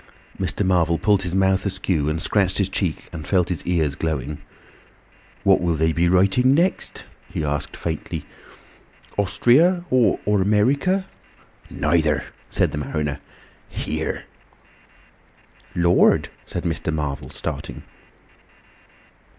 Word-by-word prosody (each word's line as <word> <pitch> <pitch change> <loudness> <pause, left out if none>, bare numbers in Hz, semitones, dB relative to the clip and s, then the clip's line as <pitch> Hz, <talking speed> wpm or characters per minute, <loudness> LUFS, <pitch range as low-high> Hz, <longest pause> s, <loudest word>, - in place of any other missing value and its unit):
Mr. 95 +2 0
Marvel 85 -3 +2
pulled 100 +1 +2
his 90 -1 -3
mouth 95 0 +2
askew 95 -6 -1
and 80 +1 -1
scratched 95 +1 +1
his 100 -2 +1
cheek 90 -5 -2
and 80 -2 -7
felt 90 -3 +2
his 90 -4 -3
ears 80 -5 +1
glowing. 75 -1 -3 1.0
"What 95 -2 +4
will 85 -2 +1
they 80 +1 +2
be 85 +1 +2
writing 100 +9 +4
next?" 175 +5 -1 0.2
he 75 - -3
asked 75 -1 -3
faintly. 80 -3 -4 0.9
"Ostria, 155 - +3
or 125 -3 +3
America?" 110 - +2 0.6
"Neither," 75 -1 +1 0.3
said - - +1
the 75 - -3
mariner. 75 0 -3 0.5
"Here." - - -3 1.5
"Lord!" 85 0 +4 0.2
said - - -4
Mr. 80 -1 -2
Marvel, 75 -3 -3
starting. - - -6
90 Hz, 115 wpm, -22 LUFS, 80-100 Hz, 1.5 s, What